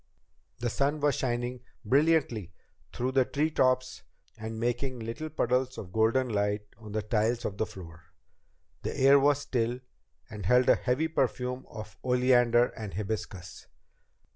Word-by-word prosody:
The 120 +2 -2
sun 145 +5 0
was 145 -1 +2
shining 120 0 -2 0.3
brilliantly 135 - +2 0.4
through 125 +2 -2
the 130 0 +4
tree 150 +5 -1
tops 130 -2 +1 0.3
and 110 0 -6
making 120 +2 -1
little 115 +8 -5
puddles 130 -2 0
of 90 -2 -8
golden 115 +4 +2
light 105 -1 0 0.2
on 105 -2 -10
the 110 -1 -1
tiles 110 +3 0
of 100 - -4
the 110 - 0
floor. 85 -4 -12 0.8
The - - -4
air 135 +1 +7
was 145 +1 +3
still, 120 -2 -1 0.5
and 105 -6 -6
held 125 +2 +4
a - - +7
heavy 130 +6 0
perfume 125 -4 -1
of 110 -1 -9
oleander 125 -1 +4
and 105 -3 -7
hibiscus. 100 -3 -5
120 Hz, 145 wpm, -29 LUFS, 110-130 Hz, 0.8 s, air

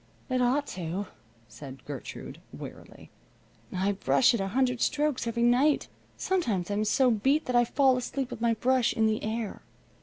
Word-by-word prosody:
"It 255 0 +1
ought 265 +4 +2
to," 180 +3 -4 0.4
said 135 -1 -11
Gertrude, 140 -3 -8
wearily. - - -11 0.6
"I 190 +2 0
brush 220 +5 +3
it 235 - 0
a 195 - -1
hundred 250 +3 0
strokes 295 -5 0
every 235 0 0
night. 255 +5 +3 0.3
Sometimes 220 - -1
I'm 210 +1 0
so 250 +4 +3
beat 270 +8 +2
that 250 - -2
I 240 0 +5
fall 265 +1 +3
asleep 255 +1 -3
with - - -7
my 230 -1 +2
brush 255 +2 +2
in 220 - +1
the 220 0 0
air. 220 -1 -3
235 Hz, 170 wpm, -28 LUFS, 205-260 Hz, 0.6 s, I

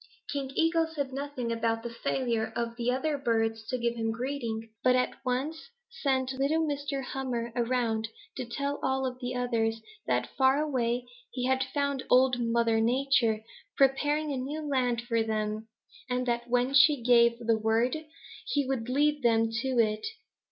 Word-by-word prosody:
"King 275 -2 -2
Eagle 330 0 +3
said 285 -4 -4
nothing 275 -4 -3
about 230 0 0
the 235 - -4
failure 230 -2 -1
of 235 0 -2
the 235 0 -1
other 285 +3 -1
birds 225 -3 0
to 255 - -1
give 235 -1 0
him 225 -1 -2
greeting 230 -2 -4
but 255 0 +5
at 250 0 +1
once 275 - -2 0.2
sent 265 - 0
little 290 +5 +1
Mr. 285 -1 -2
Hummer 245 -3 -3
around 235 -2 0 0.3
to 260 - -3
tell 280 +4 -3
all 265 -1 0
the 250 0 -3
others 230 -2 0 0.3
that - - 0
far 265 0 +4
away 250 -5 0 0.2
he 250 0 -3
had 260 0 +2
found 280 0 -1
Old 255 0 +5
Mother 230 -1 +2
Nature 240 -2 +2 0.3
preparing 290 +2 +2
a - - -2
new 295 +4 -4
land 250 -4 +1
for 230 -1 +1
them, 215 0 -2 0.4
and 250 0 0
that 240 0 -1
when 245 +2 +2
she 280 -2 +6
gave 235 -1 +5
the 230 -2 +1
word, 225 +4 +2 0.5
he 285 - +1
would 250 -3 -2
lead 295 +2 +2
them 225 -2 +3
to 225 +4 -2
it. 215 -2 +2
250 Hz, 165 wpm, -29 LUFS, 230-275 Hz, 0.5 s, she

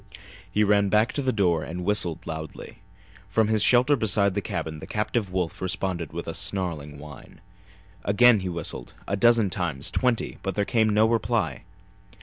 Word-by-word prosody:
He 105 - +2
ran 100 -1 +3
back 105 +3 +2
to 145 - -1
the 130 -1 +1
door 90 -8 +1
and 90 +2 -6
whistled 90 -4 0
loudly. 80 -1 -8 0.5
From 110 -1 +2
his 110 -1 +2
shelter 125 +6 +5
beside 100 -4 +2
the 100 - -1
cabin 80 -3 -5
the - - -9
captive 105 -2 -2
wolf 90 -3 -3
responded 95 -3 -2
with - - -6
a - - -3
snarling 80 -7 -2
whine. 75 0 -12 0.6
Again 115 +2 +5
he 95 -1 -4
whistled, 85 -7 -6
a 100 - 0
dozen 115 -2 +3
times, 80 -8 -2
twenty, 125 -3 -1
but 95 -2 -3
there 100 - 0
came 110 -1 +2
no 105 +1 +4
reply. 115 -1 -1
100 Hz, 170 wpm, -25 LUFS, 85-110 Hz, 0.6 s, shelter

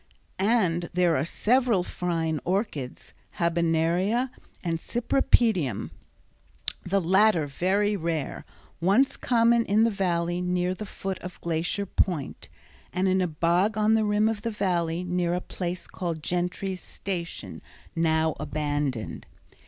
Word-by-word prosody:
And 185 -5 +2
there 175 -2 +3
are 130 - +1
several 230 - +2
fine 165 -4 -2
orchids, 175 - -3 0.2
habenaria, 170 +8 +1 0.3
and 165 -2 -1
cypripedium, 230 - +1 0.9
the 195 +2 +1
latter 190 -1 +4
very 195 +8 +1
rare, 165 -5 -3 0.4
once 205 +11 +3
common 235 -1 +3
in 215 +1 +3
the 230 - +3
Valley 175 -3 0
near 180 0 0
the 210 +2 -7
foot 195 -1 -5
of 180 0 -9
Glacier 170 +4 -1
Point, 175 -6 -1 0.4
and 185 +1 0
in 190 0 +3
a 180 - +2
bog 175 +6 +1
on 215 +1 +3
the 220 -1 +3
rim 210 +1 +2
of 220 -2 -1
the 230 - -2
Valley 175 -5 0
near 180 -1 0
a - - 0
place 180 -1 -4
called 170 -4 -4
Gentry's 180 +2 -2
Station, 175 -4 -5 0.3
now 160 -1 +2
abandoned. 145 -5 -2
180 Hz, 130 wpm, -26 LUFS, 165-205 Hz, 0.9 s, latter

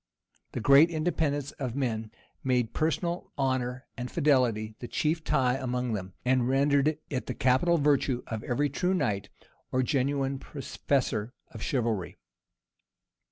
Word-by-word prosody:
The - - -2
great 140 +8 +7
independence 155 -4 -1
of 125 -3 -2
men 115 -5 -1 0.3
made 125 -3 +1
personal 170 +2 -1
honor 130 -1 -1
and 125 -1 -5
fidelity 120 -8 +2
the 120 - -6
chief 155 +5 0
tie 130 -6 +2
among 125 -2 -2
them, 95 -3 -4
and 125 -1 +2
rendered 140 +2 +3
it 130 -2 -2
the 125 - -3
capital 130 +7 +3
virtue 140 -4 +2
of 110 -1 -5
every 145 +4 +1
true 180 +5 +1
knight, 100 - -1 0.4
or 130 0 +2
genuine 135 0 0
professor 130 -5 -2 0.2
of 110 - -9
chivalry. 115 -9 -1
130 Hz, 135 wpm, -29 LUFS, 120-145 Hz, 0.4 s, great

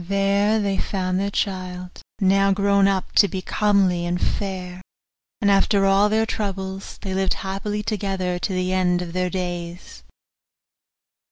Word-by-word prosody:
There 200 +3 +2
they 200 -2 -1
found 185 -1 -1
their 200 +1 -1
child, 185 -2 -4 0.2
now 195 0 +3
grown 200 0 +3
up 195 -1 -1
to 200 - +7
be 190 -2 -5
comely 195 -4 +2
and 175 +1 -1
fair; 185 -3 -3 0.6
and 200 -2 +3
after 195 0 +3
all 195 +2 +4
their 220 +1 +2
troubles 195 -3 -4
they 190 - -3
lived 190 0 0
happily 205 +2 -3
together 190 -4 -2
to 195 - -2
the 185 0 -1
end 180 -1 +1
of 170 -1 -8
their 180 0 0
days. 175 -1 -5
195 Hz, 150 wpm, -22 LUFS, 185-200 Hz, 0.6 s, to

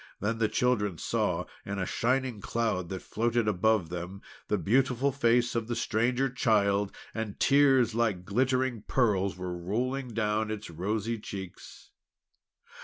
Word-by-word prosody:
Then 110 +3 -1
the 110 - +3
children 105 -6 +1
saw, - - -1 0.2
in 100 0 -4
a 95 - -1
shining 125 0 0
cloud 110 -7 -1
that 95 -1 -5
floated 115 0 0
above 105 -2 +2
them, 90 +3 -6 0.2
the 105 - +1
beautiful 130 +5 +2
face 120 -2 +2
of 115 -2 -2
the 120 - -2
Stranger 125 +6 +1
Child, 105 -5 +2 0.2
and 110 -3 -4
tears 135 -4 +4
like 110 -6 0
glittering 130 +2 +1
pearls 100 -7 +1
were 90 -1 -4
rolling 125 +10 -2
down 105 -1 0
its 110 -4 -5
rosy 105 +7 -2
cheeks. 95 -3 -9
110 Hz, 140 wpm, -29 LUFS, 100-120 Hz, 0.2 s, tears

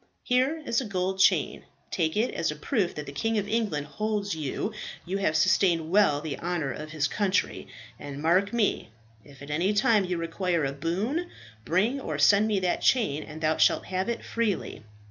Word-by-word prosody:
Here 265 +6 +1
is 235 -1 +1
a - - -5
gold 190 -1 -2
chain; - - +3 0.3
take 160 0 0
it 230 +4 +1
as 165 - -1
a 150 - -3
proof 185 - -1
that 150 - -5
the 140 - -7
King 225 +11 -1
of 205 -1 -1
England 205 -10 -1
holds 205 +6 -2
that 160 - -3 0.7
you 185 +3 -2
have 155 -6 +1
sustained 165 +1 +2
well 190 -8 +4
the 150 -3 -5
honour 170 -5 -2
of 155 +4 -7
his 155 -2 0
country; 195 +5 -1 0.3
and 140 -1 -7
mark 180 +6 +2
me, 230 -4 0 0.3
if 140 -1 -14
at 145 - -8
any 175 +7 +1
time 210 0 +3
you 180 -1 -2
require 170 -1 -1
a 135 - -2
boon, 205 - -2 0.4
bring 210 - +1
or 155 - -4
send 200 +8 +5
me 210 -3 +1
that 180 -1 0
chain, 205 - +2
and 155 +1 -9
thou 155 0 +1
shall - - +4
have 190 +3 -3
it 235 - -3
freely. 230 -5 -2
185 Hz, 195 wpm, -27 LUFS, 155-210 Hz, 0.7 s, send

